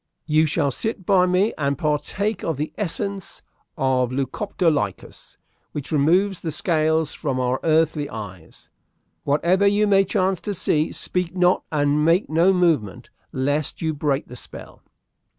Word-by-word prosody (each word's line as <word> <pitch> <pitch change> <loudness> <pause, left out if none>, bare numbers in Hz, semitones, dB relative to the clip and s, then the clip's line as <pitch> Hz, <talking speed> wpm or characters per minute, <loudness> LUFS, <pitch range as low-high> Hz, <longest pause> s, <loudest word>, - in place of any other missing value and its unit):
"You 155 0 +3
shall 145 -2 0
sit 220 - -3
by 185 -2 +4
me 185 +4 +2
and 140 -1 0
partake 190 +8 -1
of 160 -4 -2
the 150 +2 -4
essence 200 0 -4 0.3
of 130 -2 +1
Lucoptolycus, 150 - -2 0.4
which 145 +1 -6
removes 175 +6 +2
the 165 - -3
scales 160 -1 +1
from 135 -4 -3
our 125 +1 0
earthly 155 -2 +1
eyes. 95 - -10 0.5
Whatever 175 +7 +2
you 205 +1 +3
may 195 -1 +4
chance 190 -1 0
to 205 -2 -3
see, 155 -2 +1
speak 180 -1 -2
not 180 0 +3
and 145 0 +1
make 165 +2 +2
no 170 +4 +4
movement, 160 - 0 0.2
lest 145 +4 -2
you 160 -1 0
break 145 -1 -1
the 125 - -11
spell." - - -10
160 Hz, 145 wpm, -22 LUFS, 145-185 Hz, 0.5 s, by